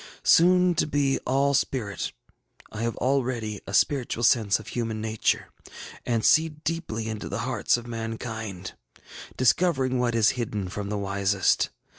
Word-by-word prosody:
Soon 180 +1 +5
to 170 - 0
be 145 -2 +1
all 140 +2 +2
spirit, 120 -7 -1 0.6
I 105 - -6
have 115 0 -2
already 125 -5 -1
a 100 - -6
spiritual 130 -5 +1
sense 110 -4 +4
of 110 - -10
human 115 -2 -3
nature, 110 0 -1 0.6
and 115 -2 0
see 160 +1 +5
deeply 155 -7 -4
into 110 -1 -5
the - - -3
hearts - - +1
of 120 - -8
mankind, 115 -4 -5 0.6
discovering 130 -1 +2
what 120 -1 0
is 110 -2 +4
hidden 105 -6 -3
from 100 +1 -5
the 105 - -2
wisest. 100 -1 +1
115 Hz, 145 wpm, -26 LUFS, 110-135 Hz, 0.6 s, Soon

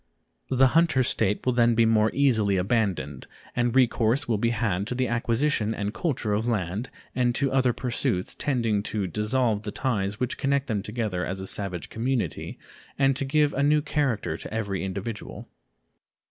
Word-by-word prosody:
The 130 0 +4
hunter 165 -5 +4
state 105 -4 0
will 125 - +2
then 120 -1 +3
be 115 0 +4
more 110 -1 +3
easily 110 -8 +2
abandoned, 95 - -1 0.3
and 120 0 +1
recourse 120 -1 +3
will 110 -3 0
be 115 - +2
had 105 -4 -1
to 125 - -3
the 130 0 0
acquisition 115 -1 0
and 105 +1 -3
culture 120 -10 -1
of 110 +3 0
land 105 +1 -2 0.2
and 120 -1 +1
to 135 -1 +1
other 130 -2 +3
pursuits 120 -7 -2
tending 115 -7 0
to 105 -1 -2
dissolve 105 +3 0
the 105 - -5
ties 105 -4 -2
which 125 0 -2
connect 140 -1 +1
them 110 -7 -1
together 105 -4 -3
as 95 +1 -4
a 95 - -5
savage 95 -3 -2
community 115 - -2 0.4
and 135 -1 +3
to 135 - -1
give 145 +1 +2
a 140 - 0
new 150 +1 +3
character 135 - -1
to - - -8
every 100 -4 -2
individual. 100 +3 -6
115 Hz, 175 wpm, -26 LUFS, 105-130 Hz, 0.4 s, The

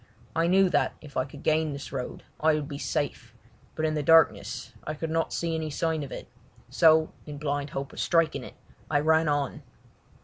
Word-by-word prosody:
I 165 +1 +2
knew 190 +2 +5
that - - +1
if 145 -3 -13
I 130 - +1
could 140 +1 -12
gain 155 -1 +2
this 140 0 -7
road 130 -2 -5 0.2
I 155 0 +4
would 150 -2 -3
be 140 -2 -6
safe, 145 -1 -3 0.4
but 155 - -1
in 155 - +1
the 150 - 0
darkness 160 +1 +3
I 155 - -4
could 160 +1 -4
not 165 0 0
see 170 -1 -1
any 160 -1 -2
sign 160 +1 -1
of 140 - -6
it, - - -7 0.4
so, 160 -1 +5 0.2
in 145 -1 -6
blind 145 0 -2
hope 135 0 -5
of - - -8
striking 165 -2 +2
it, - - -11 0.3
I 145 - +3
ran 160 +1 +3
on. 145 -2 -1
155 Hz, 205 wpm, -27 LUFS, 145-160 Hz, 0.4 s, knew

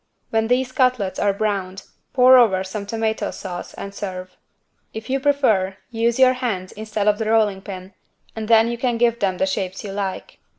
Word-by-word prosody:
When 225 0 +1
these 255 +1 +1
cutlets 255 -7 +1
are 205 - +2
browned, 195 -2 -3 0.3
pour 255 0 +6
over 190 -6 +3
some 200 +1 -6
tomato 220 0 -1
sauce 180 -2 -7
and 200 - -7
serve. 185 -2 -6 0.6
If 220 +3 -6
you 270 - +1
prefer, 230 -10 +1
use 230 0 0
your 260 -1 +6
hands 220 -8 -3
instead 215 -1 -3
of 210 0 +3
the 220 -1 -1
rolling 210 -3 +2
pin 190 -1 -9 0.4
and 220 -1 -5
then 225 0 +5
you 235 0 -3
can 245 -2 0
give 235 0 +2
them 190 -2 0
the 190 - +1
shapes 190 0 -3
you 200 - -6
like. 195 -1 -5
215 Hz, 185 wpm, -21 LUFS, 190-235 Hz, 0.6 s, pour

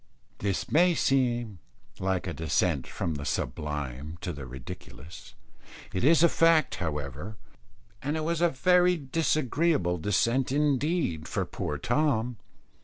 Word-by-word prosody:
This 100 -2 -2
may 175 +2 +5
seem 120 - +1 0.4
like 95 -1 -1
a 90 - -3
descent 80 -3 0
from 85 - -3
the 70 -1 -5
sublime 75 +1 -4
to 90 - -3
the 70 -3 -8
ridiculous. 80 +8 -10 0.6
It 95 - -1
is 160 +4 +5
a - - +8
fact, 165 -3 +3
however, 75 - -4 0.6
and 155 +3 -2
was 170 0 -1
a 175 - +5
very 180 +5 +3
disagreeable 145 - +1
descent 115 +8 +1
indeed 145 - 0
for - - -1
poor 75 - -4
Tom. 125 - 0
115 Hz, 125 wpm, -28 LUFS, -, 0.6 s, a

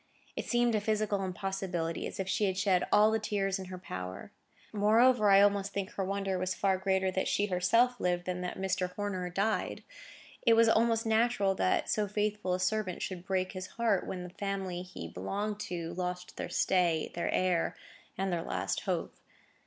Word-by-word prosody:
It - - -4
seemed 240 -1 +2
a 215 - +1
physical 210 -1 0
impossibility, 185 -3 -3
as - - -8
if 190 - -2
she 205 +2 +1
had 190 -1 -1
shed 190 -2 +2
all 215 +1 +6
the 220 - +1
tears 195 -2 -1
in 190 - -6
her 185 0 -7
power. 95 - -7 0.4
Moreover, 215 +2 +4
I 195 0 +7
almost 200 -1 +2
think 200 -1 -3
her 195 - -3
wonder 195 -1 -1
was 185 0 -1
far 190 -2 +1
greater 190 0 +1
that 190 0 -1
she 205 - +1
herself 230 +7 +2
lived 175 -1 0
than 180 0 -3
that 180 - -4
Mr. 185 -1 -1
Horner 190 -3 -3
died. 200 +5 -1 0.6
It 230 -3 +5
was 230 0 +6
almost 225 +1 +3
natural 220 -3 +2
that 185 - +1
so 210 -1 0
faithful 210 -2 -1
a - - -4
servant 185 -1 -1
should 180 -2 -5
break 185 -1 0
his 185 -1 -6
heart, 225 -5 +1
when 180 -1 -4
the 180 - -8
family 190 -2 -3
he 180 - -8
belonged 200 - -3
to 170 -1 -4
lost 180 0 -4
their - - -5
stay, 175 -4 +1
their 170 - -2
heir, 180 -2 +1 0.4
and 190 -1 -1
their 170 - 0
last - - -2
hope. - - -2
195 Hz, 190 wpm, -31 LUFS, 180-210 Hz, 0.6 s, I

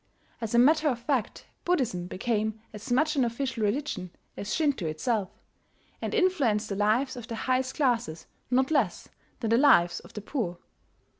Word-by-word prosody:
As 225 0 -2
a - - +5
matter 300 +5 +5
of 250 - -1
fact 240 -2 -2 0.2
Buddhism 245 - 0
became 220 +2 -1
as 210 +3 -8
much 305 +5 +2
an 270 - +3
official 235 0 -2
religion 210 -4 -1 0.3
as 200 - -5
Shinto 285 - +1
itself, 195 +5 -1 0.7
and - - -2
influenced 275 - +2
the 200 - -2
lives 225 +7 +1
of 240 -2 -8
the 230 - -5
highest 255 +3 -1
classes 235 - 0 0.2
not 260 +3 +2
less 300 - 0 0.3
than 225 -2 -1
the 230 - +5
lives 175 -11 +5
of - - -16
the 210 - -6
poor. 200 -7 -3
235 Hz, 165 wpm, -28 LUFS, 210-275 Hz, 0.7 s, a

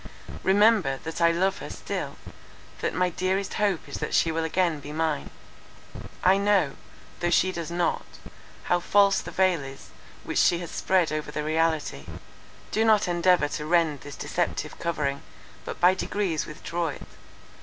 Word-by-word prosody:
Remember, 200 -7 +4
that 160 +1 -5
I 170 0 +5
love 190 +3 0
her - - -7
still, - - -5 0.6
that - - -2
my 180 0 +1
dearest 190 +3 -1
hope 200 -5 0
is - - -6
that - - -2
she 165 - +3
will 165 0 -1
again 165 -1 0
be 145 +1 -9
mine. 155 - -1 0.9
I 190 +2 +5
know, 200 -8 +2 0.4
though 175 - 0
she 185 +2 +3
does 170 -3 -5
not, 175 0 0 0.6
how 175 - +1
false 200 +2 +3
the - - -8
veil 185 -3 +2
is 135 0 -11 0.3
which - - -1
she 175 - +4
has 170 -1 -7
spread 185 -4 +1
over 155 -1 -3
the 150 0 -3
reality—do 160 - -3
not 215 -3 +4
endeavour 175 -3 +3
to 150 - -4
rend 165 -4 +2
this 145 -1 -9
deceptive - - -3
covering, 145 -4 -2 0.4
but - - -6
by 180 +1 +6
degrees 190 -4 -2
withdraw 170 +2 -3
it. 145 - -6
170 Hz, 160 wpm, -26 LUFS, 155-185 Hz, 0.9 s, by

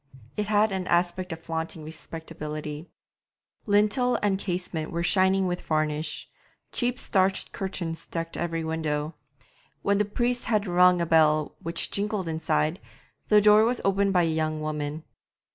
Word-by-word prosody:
It 210 -1 -2
had 210 0 +3
an 190 -1 -3
aspect 175 +1 +1
of 165 0 -7
flaunting 160 -1 -4
respectability; 155 -1 -7 0.8
lintel 210 +5 +3
and 195 -2 +2
casements 175 -4 -3
were 170 0 -2
shining 190 +2 +3
with 180 -1 -2
varnish; 155 -1 -1 0.4
cheap 245 0 0
starched 190 -5 +1
curtains 170 -4 -4
decked 165 0 -4
every 165 -1 -2
window. 155 -1 -2 0.7
When 200 0 +2
the 210 - +3
priest 240 +4 -1
had 215 -2 +1
rung 180 -1 +4
a - - +1
bell 155 -2 +3
which 170 +1 -1
jingled 200 -2 -1
inside, 160 +1 0 0.5
the 210 -1 +6
door 210 +1 +7
was 240 +2 +2
opened 195 0 +2
by 180 -2 +4
a 165 -1 +1
young 155 -1 -1
woman. 155 0 -3
175 Hz, 145 wpm, -26 LUFS, 160-200 Hz, 0.8 s, door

